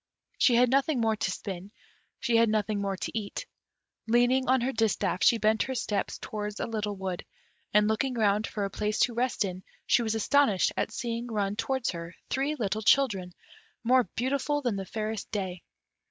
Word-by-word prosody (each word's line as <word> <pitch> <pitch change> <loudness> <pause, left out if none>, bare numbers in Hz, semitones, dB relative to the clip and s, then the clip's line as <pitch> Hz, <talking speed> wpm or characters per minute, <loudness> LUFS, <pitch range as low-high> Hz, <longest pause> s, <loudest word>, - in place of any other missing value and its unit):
She 245 - +5
had 245 +1 +4
nothing 275 0 +2
more 225 -1 +2
to - - -1
spin, 190 -1 -5 0.5
she 240 -3 +1
had 230 -1 +4
nothing 215 -1 0
more 195 -1 -2
to - - -4
eat: 215 - -4 0.6
leaning 245 +3 +3
on 260 -1 +4
her 255 +3 0
distaff, 220 -5 0
she 235 - +6
bent 220 0 +2
her 260 - -1
steps 210 -4 -2
towards 210 -1 -5
a - - -1
little 210 -2 -3
wood, 190 -2 -4 0.5
and 210 0 +4
looking 245 +4 0
round 210 -1 +2
for 205 -2 -3
a 195 - -4
place 210 +2 -1
to 240 - +3
rest 240 -2 0
in, 185 -1 -6 0.2
she - - +4
was 225 -1 -1
astonished 225 -3 +3
at - - -1
seeing 235 0 -3
run 205 -3 -1
towards 260 +2 -1
her 170 0 -7 0.2
three 275 +3 0
little 215 -4 -2
children, 205 -7 +2 0.5
more 250 +1 +4
beautiful 280 +4 0
than 240 -5 0
the 195 -1 -4
fairest 215 0 -4
day. 185 -4 -3
220 Hz, 185 wpm, -28 LUFS, 200-245 Hz, 0.6 s, she